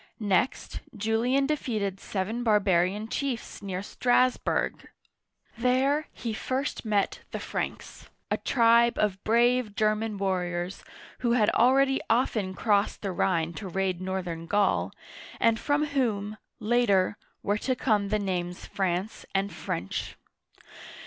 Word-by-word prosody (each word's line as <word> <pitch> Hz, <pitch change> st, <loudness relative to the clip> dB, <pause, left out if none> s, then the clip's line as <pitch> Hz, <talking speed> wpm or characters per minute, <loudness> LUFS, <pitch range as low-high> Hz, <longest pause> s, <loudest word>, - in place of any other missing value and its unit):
Next, 210 Hz, +4 st, 0 dB, 0.2 s
Julian 230 Hz, +6 st, +1 dB
defeated 215 Hz, -10 st, -2 dB
seven 215 Hz, +5 st, -3 dB
barbarian 205 Hz, -1 st, +2 dB
chiefs 255 Hz, -2 st, -3 dB
near 190 Hz, -1 st, -4 dB
Strass' 250 Hz, +3 st, +2 dB
burg. -, -, -2 dB, 0.7 s
There, 265 Hz, +5 st, +2 dB
he 230 Hz, -2 st, -5 dB
first 260 Hz, +5 st, -2 dB
met 210 Hz, -3 st, 0 dB
the -, -, -5 dB
Franks, -, -, -5 dB, 0.2 s
a -, -, +2 dB
tribe 235 Hz, -1 st, +4 dB
of 200 Hz, -2 st, 0 dB
brave 235 Hz, -1 st, +2 dB
German 215 Hz, 0 st, 0 dB
warriors 180 Hz, -2 st, -2 dB, 0.4 s
who 240 Hz, -2 st, +1 dB
had 220 Hz, -4 st, +3 dB
already 270 Hz, +2 st, +4 dB
often 220 Hz, -5 st, +1 dB
crossed 205 Hz, 0 st, +1 dB
the 195 Hz, -, -1 dB
Rhine 170 Hz, -2 st, 0 dB
to 195 Hz, +4 st, -6 dB
raid 185 Hz, 0 st, -1 dB
northern 180 Hz, -3 st, -4 dB
Gaul, 205 Hz, +2 st, +2 dB, 0.5 s
and 230 Hz, 0 st, +3 dB
from 290 Hz, +1 st, +1 dB
whom, 220 Hz, -8 st, -1 dB, 0.2 s
later, 210 Hz, -4 st, +2 dB, 0.3 s
were 205 Hz, +1 st, 0 dB
to 260 Hz, +3 st, 0 dB
come 210 Hz, -5 st, +1 dB
the 215 Hz, -, +2 dB
names 180 Hz, -3 st, -3 dB
France 190 Hz, +2 st, -2 dB
and 195 Hz, +1 st, 0 dB
French. 90 Hz, +3 st, -4 dB
210 Hz, 125 wpm, -27 LUFS, 190-240 Hz, 0.7 s, tribe